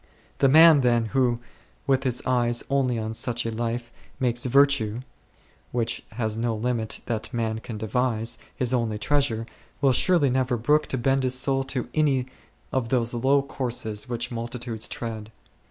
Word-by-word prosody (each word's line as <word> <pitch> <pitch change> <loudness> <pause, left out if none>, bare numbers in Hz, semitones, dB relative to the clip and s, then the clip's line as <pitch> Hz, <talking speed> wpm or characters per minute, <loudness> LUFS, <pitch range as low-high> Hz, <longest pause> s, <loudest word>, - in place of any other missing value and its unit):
The 135 - +5
man, 160 0 +8
then, 120 -2 +2
who, 125 -3 +2 0.5
with 135 0 +1
his 125 -1 0
eyes 120 -2 +1
only 130 -3 +1
on 110 0 -3
such 120 +1 -2
a 115 - -1
life, 120 +1 -3 0.3
makes 120 -2 +1
virtue, 130 -4 +3 0.7
which 115 -1 -1
has 110 -2 -2
no 115 0 -1
limit 115 0 -2
that 115 0 -3
man 110 -2 -2
can 115 -1 -7
devise, 115 +1 -1 0.2
his 125 -1 0
only 115 -4 0
treasure, 120 -2 0 0.3
will 135 -2 +3
surely 150 -1 +3
never 130 -1 +1
brook 150 +7 +2
to 130 - -2
bend 135 +2 +1
his 130 0 0
soul 135 +1 +1
to 130 -2 -2
any 140 -5 +2 0.5
of 130 -3 -1
those 120 -2 +1
low 135 +4 +2
courses 125 -4 -3
which 120 0 -3
multitudes 120 -1 -4
tread. 110 -2 -6
120 Hz, 160 wpm, -25 LUFS, 115-130 Hz, 0.7 s, man